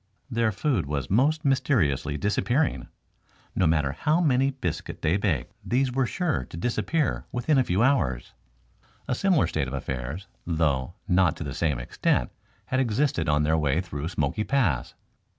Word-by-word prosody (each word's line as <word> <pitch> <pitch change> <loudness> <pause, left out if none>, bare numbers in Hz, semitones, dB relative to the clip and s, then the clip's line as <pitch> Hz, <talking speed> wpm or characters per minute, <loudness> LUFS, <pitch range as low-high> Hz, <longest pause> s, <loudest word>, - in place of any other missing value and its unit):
Their 115 -2 +2
food 120 - 0
was 70 +1 -3
most 145 +9 +2
mysteriously 90 - +1
disappearing. 120 - 0 0.7
No 90 - +3
matter 75 -4 +2
how 150 - +1
many 135 -5 +3
biscuit 90 - -5
they 80 +3 +3
baked, 95 - -1
these 130 +1 +1
were 130 0 +1
sure 165 - -1
to - - -8
disappear 135 - -1
within 135 +4 +2
a - - +4
few 95 0 +1
hours. 95 - +1 0.7
A - - 0
similar 180 +2 +3
state 75 -4 -1
of 65 - -4
affairs, 65 +7 -4 0.2
though 80 -2 0
not 90 -3 +3
to - - -6
the 70 -3 -5
same 75 -3 0
extent, - - 0 0.3
had 130 - 0
existed 120 - +1
on 75 0 +3
their 80 +1 +2
way 75 +1 +1
through 75 -4 -4
Smoky 80 +3 -1
Pass. 100 - 0
95 Hz, 160 wpm, -26 LUFS, -, 0.7 s, a